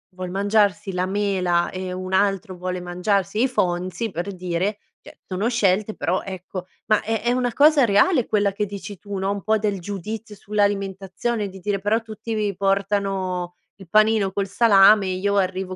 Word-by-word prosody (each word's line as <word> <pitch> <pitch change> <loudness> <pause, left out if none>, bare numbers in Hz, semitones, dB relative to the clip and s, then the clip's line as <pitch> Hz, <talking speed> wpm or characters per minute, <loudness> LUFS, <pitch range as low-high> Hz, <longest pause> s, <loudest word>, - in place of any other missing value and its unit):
vuol 185 -1 -5
mangiarsi 200 -1 +1
la 180 0 0
mela 185 -3 0
e 185 0 -5
un 185 0 -5
altro 195 -1 +1
vuole 180 0 -4
mangiarsi 195 +4 0
i - - +4
Fonzies, 185 -2 -1
per 190 +2 -4
dire, 185 +3 -2 0.2
cioè, - - -16
sono 190 +4 -1
scelte 215 -3 +1
però 185 +2 -1
ecco, 185 -1 -7 0.2
ma 215 - +3
è 225 +1 -1
è 240 +1 +1
una 245 -1 0
cosa 295 -2 +5
reale 230 - +3
quella 205 -2 +1
che 210 +2 -2
dici 200 0 -8
tu, 200 +2 -8
no, 190 +1 -1
un 200 -1 -3
po' 220 +1 +2
del 205 -2 -1
giudizio 210 +4 -6
sull'alimentazione 200 +1 -1
di 190 0 -11
dire: 200 +1 -2
"Però 210 +4 +1
tutti 225 0 -7
vi 210 -3 -1
portano 195 -2 -1 0.2
il 195 -3 -14
panino 215 0 +3
col 200 0 -2
salame 200 -1 +6
e 185 -1 -2
io 200 +2 0
arrivo 185 0 -1
200 Hz, 180 wpm, -22 LUFS, 185-210 Hz, 0.2 s, salame